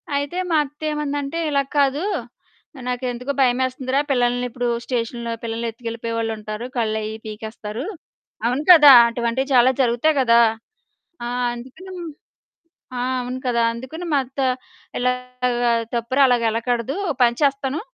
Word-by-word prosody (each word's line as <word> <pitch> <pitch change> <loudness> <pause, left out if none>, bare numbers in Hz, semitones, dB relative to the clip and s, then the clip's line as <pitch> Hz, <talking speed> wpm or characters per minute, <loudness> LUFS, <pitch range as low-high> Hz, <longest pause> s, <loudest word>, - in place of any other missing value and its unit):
అయితే 285 +5 -2
మా 315 - +4
అత్త 295 +2 -14
ఏమందంటే 290 +1 -3
"ఇలా 280 -1 +2 0.2
కాదు. 280 +4 +2 0.8
నాకెందుకో 250 +1 -3
భయమేస్తుందిరా! 260 +1 +1
పిల్లల్ని 245 -1 +1
ఇప్పుడు 245 +1 -3 0.2
స్టేషన్‌లో 235 -1 -3
పిల్లల్నెత్తుకెళ్ళిపోయేవాళ్ళుంటారు. 230 -1 -4
కళ్ళయి 220 -1 -1
పీకేస్తారు" 220 +3 -6 0.6
అవును 255 +5 0
కదా! 295 -5 +10 0.2
అటువంటివి 235 +3 -1
చాలా 250 +1 +6
జరుగుతాయి 250 +6 +2
గదా! 235 -1 +5 0.8
ఆ! - - -3 0.3
అందుకని 265 +11 -11 1.1
ఆ! - - -1 0.2
అవును 250 +1 -5
కదా! 235 -1 +2
అందుకని 260 +9 -7
మా 280 - +4
అత్త 265 +2 -11 0.6
ఇలాగా 250 -1 0 0.2
"తప్పురా 255 +4 +2
అలాగెళ్ళకూడదు, 235 +2 0
ఓ - - +2
పని 235 0 +2
చేస్తాను 275 +2 0
245 Hz, 115 wpm, -21 LUFS, 235-275 Hz, 1.1 s, కదా